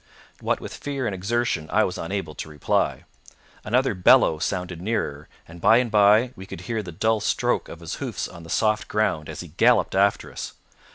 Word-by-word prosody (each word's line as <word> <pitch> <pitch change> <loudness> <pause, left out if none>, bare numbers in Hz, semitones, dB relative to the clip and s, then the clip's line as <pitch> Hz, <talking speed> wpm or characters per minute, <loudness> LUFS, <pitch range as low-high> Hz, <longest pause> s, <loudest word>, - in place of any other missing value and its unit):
What - - 0
with - - -8
fear 140 -3 -4
and 105 - -1
exertion 95 -4 -1
I 110 +3 +4
was 90 - -3
unable 85 -2 -4
to 80 - -7
reply. 75 -2 0 0.6
Another 125 +3 +1
bellow 90 -4 +5
sounded 90 -1 -3
nearer, 75 -8 -2 0.2
and 85 0 -12
by 115 - +6
and 120 -2 0
by 105 +4 +5
we 95 - -10
could 85 - -8
hear 115 +3 -3
the 90 -4 -8
dull 110 +6 +1
stroke - - 0
of - - -10
his - - -5
hoofs - - -3
on 85 - -12
the 85 - -12
soft 110 +4 +1
ground 80 -8 0
as 75 - -6
he 85 - -10
galloped 115 +10 +3
after 100 +1 +2
us. - - -6
100 Hz, 195 wpm, -24 LUFS, 85-110 Hz, 0.6 s, by